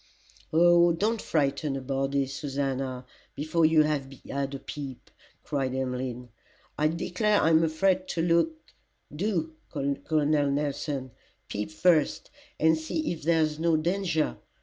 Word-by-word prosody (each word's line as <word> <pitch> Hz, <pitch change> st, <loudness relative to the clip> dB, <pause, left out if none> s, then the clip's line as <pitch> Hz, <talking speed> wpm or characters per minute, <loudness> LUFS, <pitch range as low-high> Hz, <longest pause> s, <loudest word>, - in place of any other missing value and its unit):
"Oh! 175 Hz, +1 st, +5 dB
don't 215 Hz, +6 st, 0 dB
frighten 140 Hz, -1 st, 0 dB
a 135 Hz, -, -3 dB
body, 135 Hz, +1 st, 0 dB
Susannah, 135 Hz, -2 st, -3 dB, 0.3 s
before 155 Hz, +3 st, -1 dB
we 160 Hz, 0 st, +4 dB
have 145 Hz, -3 st, -1 dB, 0.2 s
had 140 Hz, 0 st, -3 dB
a -, -, -3 dB
peep," 135 Hz, -2 st, -8 dB, 0.3 s
cried 135 Hz, -3 st, -2 dB
Emmeline; 125 Hz, -1 st, -3 dB, 0.5 s
"I 150 Hz, -, +2 dB
declare 185 Hz, +6 st, +1 dB
I'm 160 Hz, +1 st, +4 dB
afraid 185 Hz, +4 st, +1 dB
to 165 Hz, -, -1 dB
look 170 Hz, -, +2 dB, 0.6 s
do, 165 Hz, -3 st, -1 dB, 0.2 s
Col. 145 Hz, +1 st, -1 dB
Nelson, 145 Hz, -2 st, 0 dB, 0.4 s
peep 105 Hz, +1 st, -3 dB
first 160 Hz, -1 st, +2 dB, 0.3 s
and 160 Hz, +1 st, +5 dB
see 160 Hz, -, -2 dB
if 170 Hz, -, -5 dB
there's 155 Hz, -1 st, +1 dB
no 165 Hz, -1 st, +3 dB
danger." 170 Hz, -1 st, 0 dB
155 Hz, 125 wpm, -27 LUFS, 135-170 Hz, 0.6 s, Oh